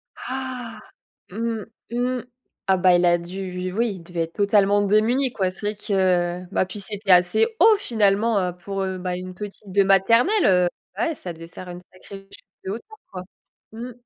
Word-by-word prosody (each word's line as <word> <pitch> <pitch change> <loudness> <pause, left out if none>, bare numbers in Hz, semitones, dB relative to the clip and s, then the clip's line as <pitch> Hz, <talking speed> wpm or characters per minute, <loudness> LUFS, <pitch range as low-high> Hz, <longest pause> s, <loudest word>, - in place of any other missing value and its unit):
Ah, 255 -2 -6 0.5
mmh, 225 +1 -3 0.3
mmh, 245 +1 -1 0.4
ah, 190 - +4
bah, 180 0 +5
il 175 0 +3
a 175 0 +4
dû, 185 +2 -6
lui 180 0 -4
oui, 230 +4 0
il 170 - -12
devait 170 0 -3
être 165 0 -5
totalement 205 0 +3
démuni, 225 +6 +2
quoi. 190 -5 0
C'est 200 +3 -7
vrai 210 - -1
que, 205 0 -6 0.5
heu, 180 - -11
bah, 195 - +1
puis 200 +2 -7
c'était 205 0 -3
assez 180 - +5
haut 440 -1 +7
finalement, 215 - +2
heu, 180 -1 -2
pour, 195 +2 -4
heu, 190 -1 -3
bah, 180 0 -3
une 185 0 -7
petite 205 0 -8
de 200 +2 +4
maternelle, 230 - +4
heu, 180 -2 +4 0.3
ouais, 335 -2 0
ça 180 -10 -6
devait 165 0 -11
faire 180 +2 -10
une 175 0 -8
sacrée 195 +1 -12
chute - - -15 0.2
de 190 - -4
hauteur, 240 - -8
quoi. 185 -1 -6 0.5
Mmh. 235 +3 -7
195 Hz, 195 wpm, -23 LUFS, 185-230 Hz, 0.5 s, haut